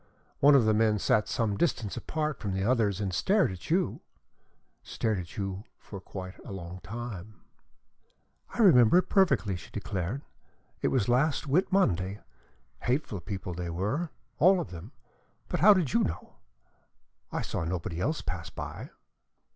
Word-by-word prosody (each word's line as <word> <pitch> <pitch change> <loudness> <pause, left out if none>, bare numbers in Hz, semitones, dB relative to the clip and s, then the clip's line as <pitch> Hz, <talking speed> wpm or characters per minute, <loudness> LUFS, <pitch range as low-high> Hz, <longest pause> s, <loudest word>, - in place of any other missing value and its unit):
One 145 +1 +7
of 130 -5 +5
the 110 - +4
men 110 0 +3
sat 105 +1 +2
some 110 -5 0
distance 115 - 0
apart 155 -3 -3
from 100 -2 -3
the 95 - -1
others 105 -4 +2
and 100 -3 -2
stared 190 - +2
at 95 - -9
you 180 +3 +1 0.8
stared 110 -4 -2
at 85 -1 -9
you 95 -1 -3
for 100 -3 -10
quite 95 -1 -8
a - - -9
long 90 -1 -7
time." 105 +1 -7 1.2
"I - - +1
remember 125 - +7
it 180 0 +2
perfectly," 140 - +3
she 90 - -10
declared. 105 +4 -4 0.6
"It - - +2
was 125 -7 +1
last 140 +6 +2
Whit 160 +9 +1
Monday. 100 - +1 0.6
Hateful 120 -5 -1
people 95 0 -5
they 85 0 -4
were, 105 - -2 0.3
all 185 +3 +6
of 170 - -5
them. 90 +6 -9 0.6
But - - -2
how 210 - +8
did 170 -9 0
you 115 - +4
know? 85 +2 -5 0.9
I - - -2
saw - - -3
nobody 85 0 -3
else 155 - -1
pass 85 -1 -5
by." - - -7
105 Hz, 160 wpm, -29 LUFS, 95-140 Hz, 1.2 s, how